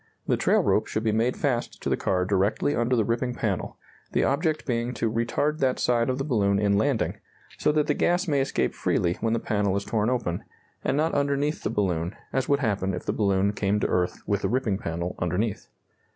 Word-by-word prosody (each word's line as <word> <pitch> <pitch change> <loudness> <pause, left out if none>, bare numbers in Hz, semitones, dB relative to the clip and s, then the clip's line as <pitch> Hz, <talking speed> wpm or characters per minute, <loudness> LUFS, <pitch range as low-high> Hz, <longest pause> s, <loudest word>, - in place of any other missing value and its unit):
The - - +2
trail - - +3
rope - - +2
should 110 - -2
be 110 - +2
made 115 +4 +1
fast 125 -5 -1
to - - -2
the - - +2
car 90 -1 0
directly 100 +9 +1
under 120 +2 +1
the 110 -3 +2
ripping 120 +2 -1
panel, 100 -5 -2 0.4
the - - +2
object 155 +2 0
being 120 0 -1
to 115 -1 0
retard 120 +7 0
that 130 -1 +2
side 120 0 +1
of 130 - 0
the 135 - -1
balloon 100 -8 +2
in 100 0 +2
landing, 115 +3 0 0.4
so 150 - +3
that 150 -1 +2
the 150 - +1
gas 175 +5 +1
may 145 -3 +2
escape 135 - 0
freely 85 0 0
when 115 0 +1
the 115 - +1
panel 100 -3 0
is 100 - -3
torn 110 0 0
open, 120 -9 -1 0.4
and 135 - 0
not 160 +2 +1
underneath 140 +1 0
the - - -1
balloon, 90 -5 -1 0.2
as 130 0 0
would 140 0 +3
happen 100 -5 0
if - - -7
the - - 0
balloon 100 -1 +2
came 105 0 0
to - - +1
earth 90 -1 0
with 100 -1 0
the 95 - 0
ripping 110 -5 0
panel 85 +2 -3
underneath. 95 +5 -1
115 Hz, 220 wpm, -26 LUFS, 100-135 Hz, 0.4 s, trail